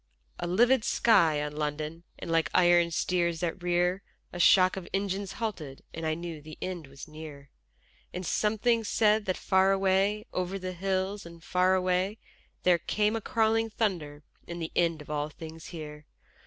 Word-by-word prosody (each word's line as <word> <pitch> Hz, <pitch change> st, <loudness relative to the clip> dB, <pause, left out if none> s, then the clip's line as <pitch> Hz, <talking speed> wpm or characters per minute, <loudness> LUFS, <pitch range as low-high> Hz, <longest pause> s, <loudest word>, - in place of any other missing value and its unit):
_ -, -, -47 dB, 0.4 s
A 175 Hz, -, -2 dB
livid 235 Hz, +7 st, +4 dB
sky 165 Hz, -13 st, +3 dB
on 150 Hz, 0 st, -5 dB
London 150 Hz, +2 st, -3 dB, 0.2 s
And -, -, -6 dB
like 165 Hz, -1 st, +2 dB
iron 175 Hz, -1 st, +5 dB
steeds 170 Hz, 0 st, 0 dB
that 175 Hz, +1 st, -2 dB
rear 180 Hz, +2 st, +1 dB, 0.3 s
A 175 Hz, -, -6 dB
shock 185 Hz, +1 st, +6 dB
of 190 Hz, -2 st, -7 dB
engines 195 Hz, 0 st, -2 dB
halted, 160 Hz, -12 st, -5 dB
And 160 Hz, 0 st, -4 dB
I 155 Hz, -, 0 dB
knew 170 Hz, -2 st, -6 dB
the 155 Hz, +1 st, -11 dB
end 175 Hz, -5 st, -5 dB
was 135 Hz, +3 st, -11 dB
near: 155 Hz, -3 st, -10 dB, 0.6 s
And 180 Hz, +1 st, -5 dB
something 220 Hz, +5 st, +1 dB
said 215 Hz, 0 st, +2 dB
that 185 Hz, -, -1 dB
far 190 Hz, 0 st, +3 dB
away, 195 Hz, +2 st, +2 dB
over 185 Hz, +1 st, -2 dB
the 185 Hz, -1 st, -5 dB
hills 190 Hz, +2 st, -2 dB
and 170 Hz, -1 st, -13 dB
far 185 Hz, +1 st, +2 dB
away, 185 Hz, +3 st, 0 dB, 0.5 s
There 180 Hz, -1 st, +4 dB
came 210 Hz, +5 st, 0 dB
a 225 Hz, -, -2 dB
crawling 225 Hz, +1 st, +1 dB
thunder 170 Hz, -10 st, -2 dB, 0.2 s
and 170 Hz, 0 st, -6 dB
the 165 Hz, -1 st, -4 dB
end 165 Hz, -3 st, +1 dB
of 150 Hz, -, -10 dB
all 150 Hz, 0 st, -1 dB
things 160 Hz, +1 st, -10 dB
here. 150 Hz, -2 st, -9 dB
180 Hz, 175 wpm, -29 LUFS, 160-195 Hz, 0.6 s, shock